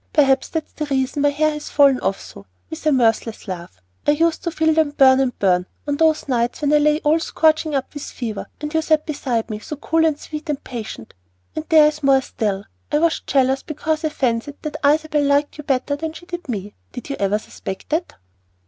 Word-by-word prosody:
Perhaps 270 -3 +3
that's 320 -2 -4
the 300 - -4
reason 270 0 0
my 290 - +4
hair 310 +2 +1
has 300 0 -6
fallen 275 -3 +5
off 195 - -1
so," 100 - -12 0.2
with 320 - -7
a - - +5
mirthless 225 -4 +1
laugh. 170 - -7 0.3
"I 295 - +6
used 325 +2 +1
to - - +1
feel 320 -1 +2
them 310 -2 +1
burn 260 -1 +6
and 260 -3 0
burn, 180 -2 +2 0.2
on 285 0 0
those 315 -1 +2
nights 240 -1 0
when 290 0 +2
I 300 - +6
lay 300 +1 +3
all 310 +2 +3
scorching 315 -1 +1
up 270 -1 -2
with 290 - -6
fever, 225 -7 -5
and 300 +1 -5
you 320 - +2
sat 310 -1 +2
beside 255 -7 -2
me 210 - -4
so 300 - -7
cool 320 +3 +1
and 310 -2 +1
sweet 305 +1 -7
and 290 -2 -2
patient. 220 - -7 0.4
And 310 - -4
there 315 -2 +7
is 300 0 0
more 270 -1 +4
still. 205 -5 -2 0.3
I - - +3
was 330 +1 +2
jealous 265 0 +1
because 310 +1 -3
I 310 - +1
fancied 260 -1 -1
that 305 - -4
Isabel 300 +1 +3
liked 285 +1 +1
you - - -5
better 280 0 0
than 315 +2 -4
she 350 - -12
did 350 -4 -7
me. 205 -3 -4 0.2
Did 255 +3 -7
you - - -2
ever 200 +1 +2
suspect 190 -2 -8
that?" 330 +3 -1
290 Hz, 220 wpm, -21 LUFS, 250-310 Hz, 0.4 s, there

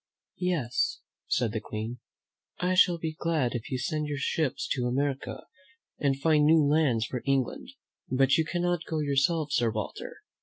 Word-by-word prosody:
"Yes," 180 - 0 0.3
said 120 -4 +1
the 110 - -2
Queen, 110 +3 -5 0.6
"I 180 +1 0
shall 180 -1 +5
be 160 -1 -3
glad 155 -6 0
if 120 -3 -5
you 130 - -1
send 150 +4 -2
your 145 -1 -3
ships 145 0 -1
to 125 -2 0
America 135 +2 -2 0.6
and 135 -2 +1
find 150 0 +3
new 160 -1 +5
lands 140 -7 +2
for 125 +3 -4
England; 135 -2 -1 0.4
but 135 +1 +3
you 160 - +3
cannot 175 +1 -1
go 160 - -3
yourself, 150 +1 +1
Sir 120 -4 +2
Walter. 110 -2 -6
145 Hz, 160 wpm, -28 LUFS, 125-160 Hz, 0.6 s, shall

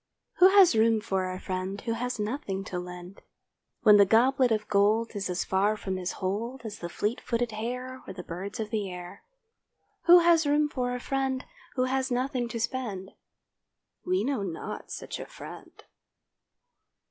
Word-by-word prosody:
Who 365 - +8
has 385 - +6
room 225 0 +4
for 190 -4 -2
a 185 - -5
friend 185 +2 -4
Who 230 - -3
has 250 +2 -3
nothing 210 -3 -3
to 180 -2 -4
lend, 180 +1 -9 0.6
When 210 -1 +8
the 200 - +7
goblet 250 +4 +4
of 215 -1 0
gold 215 +3 +2
Is 200 -2 -3
as 180 0 -1
far 200 +3 +1
from 190 -2 -3
his 180 -1 -3
hold 225 +7 -3
As 210 -2 -6
the 170 - -5
fleet 210 +7 -2
footed 235 -1 -1
hare, 250 +4 -5
Or - - -5
the 180 -1 -8
birds 195 +7 -6
of 215 -1 -4
the 210 -3 -1
air. 180 -1 -9 0.8
Who 350 0 +9
has 335 -2 +4
room 295 +1 +3
for 250 -3 -2
a - - -4
friend 265 0 -2 0.3
Who 255 - +2
has 265 +1 0
nothing 250 0 -1
to 230 0 -5
spend? 220 -6 -3 0.9
We 370 +1 +1
know 270 -5 -1
not 175 -5 -5
such - - -6
a - - -7
friend. - - -11
225 Hz, 175 wpm, -28 LUFS, 195-255 Hz, 0.9 s, Who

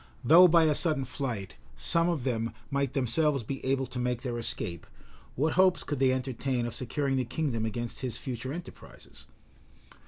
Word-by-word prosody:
Though, 175 +4 +8
by 170 -1 +5
a 155 -1 +4
sudden 150 -3 +1
flight, 120 -8 -5 0.2
some 165 - +2
of 160 -7 -1
them 115 -3 -1 0.2
might 140 -1 0
themselves 140 +1 +1
be, 135 +5 -6
able 135 0 0
to 125 - -6
make 125 0 -1
their 120 -3 -3
escape, 85 -7 -3 0.5
what 155 +5 +1
hopes 185 -1 +4
could 145 -3 -3
they 135 -1 +4
entertain 130 -1 -2
of 120 - -4
securing 135 +2 -1
the 130 - +1
kingdom 120 -3 -2
against 120 +2 -5
his 125 -3 -3
future 130 -1 -5
enterprises? 170 +3 -11
130 Hz, 175 wpm, -29 LUFS, 120-150 Hz, 0.5 s, Though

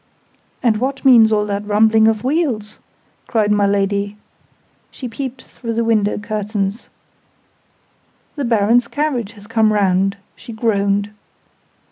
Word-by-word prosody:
"And 225 -3 +3
what 265 +4 -3
means 230 -4 +7
all 210 -1 +2
that 200 0 -3
rumbling 220 +1 +3
of 220 -1 +1
wheels?" 255 -7 -1 0.5
cried 215 -3 +1
my 205 -1 +3
Lady. 200 +1 -1 0.7
She 255 - -8
peeped 260 +2 -6
through 230 -2 -7
the 230 - +1
window 215 -3 +1
curtains. 210 0 -3 1.5
"The 285 - -3
Baron's 230 +1 +2
carriage 260 -8 -2
has 205 -2 -15
come 220 0 +2
round!" 195 -1 +1 0.2
she 230 - -11
groaned. 205 -2 0
215 Hz, 125 wpm, -18 LUFS, 205-235 Hz, 1.5 s, means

